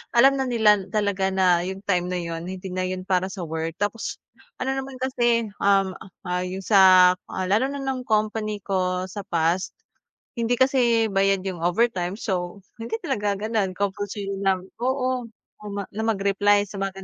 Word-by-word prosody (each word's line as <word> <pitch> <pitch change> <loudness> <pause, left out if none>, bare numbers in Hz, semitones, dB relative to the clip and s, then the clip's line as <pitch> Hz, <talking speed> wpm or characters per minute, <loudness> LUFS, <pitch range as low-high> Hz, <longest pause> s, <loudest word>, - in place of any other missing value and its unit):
alam 270 +3 +6
na 265 - 0
nila 210 -5 +3
talaga 200 -1 0
na 185 -2 +3
yung 190 +1 -6
time 180 -3 0
na 180 - -2
yun 170 -1 -4
hindi 185 0 -6
na 185 0 -1
yun 185 0 -4
para 185 0 +1
sa 190 -1 -6
work. 160 0 -4
Tapos 205 +3 -3 0.4
ano 260 +1 -2
naman 270 0 -4
kasi, 240 -4 +1
um, 195 -1 +3 0.4
ah, 180 0 0
yung 185 +1 -5
sa, 185 -3 +7 0.2
ah, 190 - -4
lalo 215 +7 +2
na 280 0 -5
ng 260 -2 -3
company 215 -1 -1
ko 185 -2 -1
sa 195 +2 -7
past. 170 +1 0 0.6
Hindi 235 0 0
kasi 245 -4 +3
bayad 195 -1 +2
yung 175 -3 -5
overtime, 185 0 0
so 180 -1 -3 0.2
hindi 225 0 -4
talaga 205 -1 -1
ganun 215 -4 0
compulsory 200 +1 -3 0.2
na 190 -1 +2 0.2
oo 255 -1 0 0.4
naman 200 -1 -4
na 220 - -2
mag-reply 205 -1 +2
sa 200 - -11
mga. 195 0 -3
200 Hz, 170 wpm, -24 LUFS, 185-225 Hz, 0.6 s, sa